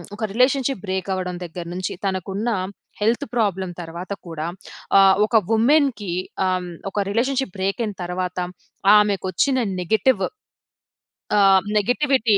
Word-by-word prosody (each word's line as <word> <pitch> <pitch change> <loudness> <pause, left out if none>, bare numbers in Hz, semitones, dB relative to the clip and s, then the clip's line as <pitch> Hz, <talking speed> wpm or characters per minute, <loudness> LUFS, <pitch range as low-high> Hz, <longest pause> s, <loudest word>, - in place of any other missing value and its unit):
ఒక 220 - -6
relationship 255 -1 +2
break 190 +1 -2
అవ్వడం 180 -1 -3
దగ్గర 170 +1 -7
నుంచి, 185 0 -3
తనకు 190 -1 -2
ఉన్న 220 +4 -1 0.5
హెల్త్ 225 +3 +1
ప్రాబ్లమ్ 190 -5 0
తర్వాత 170 +3 -8 0.2
కూడా, 165 -1 -4 0.5
ఆహ్, 195 -1 +7
ఒక 230 - -2 0.2
ఉమెన్‌కి 245 - +2 0.4
ఆహ్, 185 -1 -1 0.2
ఒక 205 +1 0
రిలేషన్షిప్ 255 -1 0
బ్రేక్ 195 +4 -1
అయిన 210 -2 -5
తర్వాత 180 +1 -3 0.6
ఆమెకు 205 -3 +2
వచ్చిన 270 +6 +2 0.2
నెగెటివ్... 215 +4 +2 1.2
ఆహ్, 195 -1 +6 0.2
నెగిటివిటీ 245 -1 +2
200 Hz, 125 wpm, -22 LUFS, 185-235 Hz, 1.2 s, ఆహ్